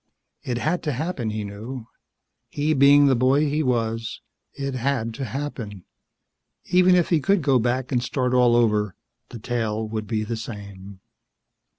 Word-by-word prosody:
It 120 -2 -3
had 160 +7 -1
to 150 -3 -2
happen, 140 -4 -3
he 110 0 -3
knew. 110 +5 -7 0.6
He 150 +2 0
being 145 +1 +6
the 135 -2 +4
boy 130 +4 +3
he 150 +2 0
was, 115 -4 -1 0.3
it 140 -1 -4
had 125 -3 -1
to 135 +4 -4
happen. 120 -9 -6 0.8
Even 180 0 +4
if 175 -2 +2
he 165 - +3
could 190 +4 +1
go 135 -3 +3
back 125 +3 -1
and 125 -2 +1
start 125 0 -1
all 125 -2 +4
over, 105 -5 +2 0.3
the 120 - -8
tale 110 -2 -2
would 110 -1 -4
be 110 +1 -1
the 115 +1 -4
same. 100 -3 -9
125 Hz, 165 wpm, -23 LUFS, 110-140 Hz, 0.8 s, being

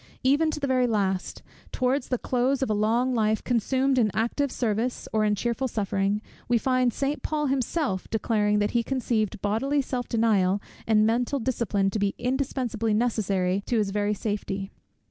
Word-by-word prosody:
Even 290 +5 +3
to 310 - -3
the 285 - -1
very 255 -2 +2
last, 195 -4 -1 0.3
towards 255 +1 0
the 250 - 0
close 255 +3 0
of 255 - -1
a - - +3
long 230 +5 +1
life 220 -2 +1
consumed 260 +3 +1
in 220 -3 +3
active 240 +5 0
service, 235 +1 -1
or 215 -1 +2
in 210 -1 +2
cheerful 240 +5 -1
suffering, 200 -1 -1 0.2
we 240 - +3
find 255 +1 +2
St. 280 +5 -2
Paul 300 -1 -1
himself 265 - -1
declaring, 210 -1 +1
that 205 0 +1
he 240 - +2
conceived 230 -5 -1
bodily 265 +8 +1
self 255 -2 -2
denial 205 -4 +2 0.3
and 215 -1 +4
mental 240 +5 +1
discipline 220 -6 0
to 215 - -2
be 200 -1 0
indispensably 250 -4 -1
necessary 200 -5 0
to 240 - +1
his 205 -2 +1
very 205 +1 0
safety. 200 -1 -3
230 Hz, 170 wpm, -26 LUFS, 210-255 Hz, 0.3 s, and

